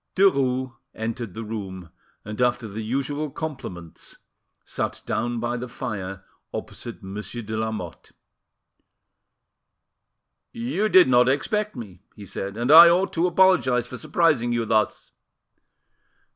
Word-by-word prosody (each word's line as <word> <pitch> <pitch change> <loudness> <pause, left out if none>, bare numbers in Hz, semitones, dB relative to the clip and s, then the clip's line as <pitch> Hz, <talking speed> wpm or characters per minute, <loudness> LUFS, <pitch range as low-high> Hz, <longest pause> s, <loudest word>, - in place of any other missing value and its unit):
Derues 130 -9 +2 0.2
entered 115 -2 -5
the 115 - -5
room, 95 -6 -7 0.3
and, 105 +3 -5
after 120 -1 +1
the 105 +2 -6
usual 140 +6 -2
compliments, 130 - -8 0.5
sat - - -4
down 120 +1 -2
by 120 +1 -2
the 125 +1 -5
fire, 100 -6 -6 0.3
opposite - - -7
Monsieur 105 +5 -7
de 110 +1 -5
Lamotte. 110 -6 -5 2.4
"You 155 - -1
did 185 -6 +7
not 125 0 +5
expect 210 - -1
me," 100 -7 -9
he 105 - -10
said, 100 +1 -6
"and 120 +4 +1
I 170 +2 +11
ought 180 +2 +2
to 170 +2 +2
apologise 175 -10 +3
for 125 0 -8
surprising 145 -5 +1
you 120 -1 0
thus." 110 -2 0
120 Hz, 125 wpm, -24 LUFS, 110-140 Hz, 2.4 s, I